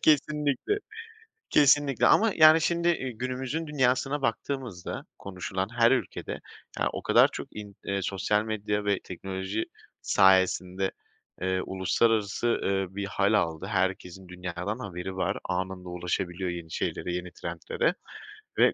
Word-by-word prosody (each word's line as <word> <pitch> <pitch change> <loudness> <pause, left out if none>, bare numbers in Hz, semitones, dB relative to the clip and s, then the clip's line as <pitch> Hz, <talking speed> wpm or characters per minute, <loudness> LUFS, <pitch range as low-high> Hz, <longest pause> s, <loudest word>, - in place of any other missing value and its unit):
Kesinlikle, 150 - +2 0.7
kesinlikle 145 -2 +4
ama 225 -2 +5
yani, 155 0 +8
şimdi, 170 +1 +1
iii, 130 -9 -1
günümüzün 130 +5 -3
dünyasına 135 0 +1
baktığımızda 125 -6 -3
konuşulan 95 0 -4
her 115 0 +4
ülkede 135 - -2 0.4
ya, - - +2
o - - -5
kadar - - +6
çok - - -6
in 105 -2 -8
eee, 100 -1 -1
sosyal 105 +3 0
medya 105 -1 -2
ve 100 -2 +2
teknoloji 95 +3 -4 0.4
sayesinde, 95 0 +3 0.5
eee, 95 0 0
uluslararası, 100 +4 +1
ııı, 95 -4 0
bir 100 -1 -2
hâl 100 +1 +1
aldı. 80 -2 0
Herkesin 95 -2 -2
dünyadan 90 +4 -4
haberi 95 -4 -6
var. 95 - 0
Anında 95 0 -3
ulaşabiliyor 90 +1 -2
yeni 85 -2 -6
şeylere, 90 - -2
yeni 90 0 -4
trendlere 85 -1 -2 0.6
ve - - +5
100 Hz, 130 wpm, -28 LUFS, 95-130 Hz, 0.7 s, yani